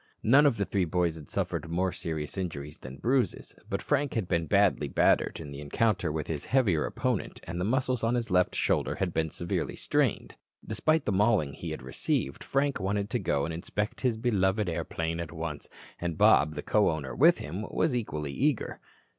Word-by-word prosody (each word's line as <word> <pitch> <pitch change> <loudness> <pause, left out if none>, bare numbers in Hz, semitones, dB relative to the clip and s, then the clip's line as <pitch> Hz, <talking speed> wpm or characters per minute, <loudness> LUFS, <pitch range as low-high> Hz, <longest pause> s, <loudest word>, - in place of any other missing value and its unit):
None 140 +6 +6
of 130 - +1
the 100 - 0
three 95 -2 0
boys 85 0 +1
had 80 -3 -11
suffered 80 - -2
more 90 +2 0
serious 80 -3 -4
injuries 75 -6 -5
than 65 +1 -9
bruises, 130 +1 0
but - - -2
Frank 145 -2 0
had 110 -6 -1
been 85 -2 0
badly - - +3
battered - - +2
in 75 -3 -8
the 70 0 -7
encounter 90 +3 +1
with 75 -1 -3
his 75 -3 -4
heavier 110 - +2
opponent - - -2
and 85 +1 -4
the - - 0
muscles 130 +1 0
of 115 +2 +2
his 120 -4 -2
left 90 0 +3
shoulder - - +1
had 90 -3 -2
been 80 0 0
severely 85 +2 -3
strained. - - 0 0.3
Despite 155 -1 +1
the - - +1
mauling 100 -7 +2
he - - -6
had - - -6
received, 65 +1 -2
Frank 140 -1 0
wanted 100 +2 -1
to - - 0
go 70 0 0
and 80 - -4
inspect 105 +5 -3
his 125 -4 +1
beloved 105 -3 +1
airplane 80 0 -2
at 85 -2 -5
once 80 -2 -5 0.3
and 85 -2 -3
Bob, 75 +4 +5
the - - -4
co 105 -1 +3
owner 70 -5 -3
with - - +6
him, 90 +10 -5
was 155 -6 +1
equally 75 - -3
eager. 140 - 0
90 Hz, 195 wpm, -29 LUFS, 80-115 Hz, 0.3 s, None